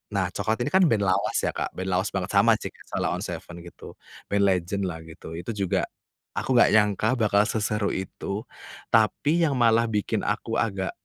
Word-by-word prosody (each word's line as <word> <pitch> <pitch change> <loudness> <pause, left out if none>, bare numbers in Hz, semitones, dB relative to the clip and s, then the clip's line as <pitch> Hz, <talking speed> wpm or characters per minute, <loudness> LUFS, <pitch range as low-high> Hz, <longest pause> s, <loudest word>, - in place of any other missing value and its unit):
Nah, 95 -2 +1
Cokelat 110 +2 -1
ini 145 - -3
kan 190 - +6
band 105 -3 +2
lawas 95 -1 +1
ya, - - +1
Kak, - - -2
band 95 - -4
lawas 95 +3 +1
banget, 95 -2 -2
sama - - +5
sih - - -6 0.2
Sheila - - -1
On - - -5
7 - - -4 0.3
gitu. 85 - -12 0.4
Band 100 0 +1
legend 95 +1 0
lah 80 -1 -7
gitu, 80 0 -10
itu 90 +6 -5
juga 100 -3 0 0.5
aku 130 - 0
gak 120 - +6
nyangka 105 +3 +3
bakal 105 -2 +3
seseru 105 -2 -1
itu, 100 +2 -4 0.5
tapi 145 +9 +3
yang 145 - +1
malah 115 -1 +4
bikin 105 -2 -1
aku - - -1
agak 95 -4 -1
100 Hz, 190 wpm, -25 LUFS, 95-110 Hz, 0.5 s, kan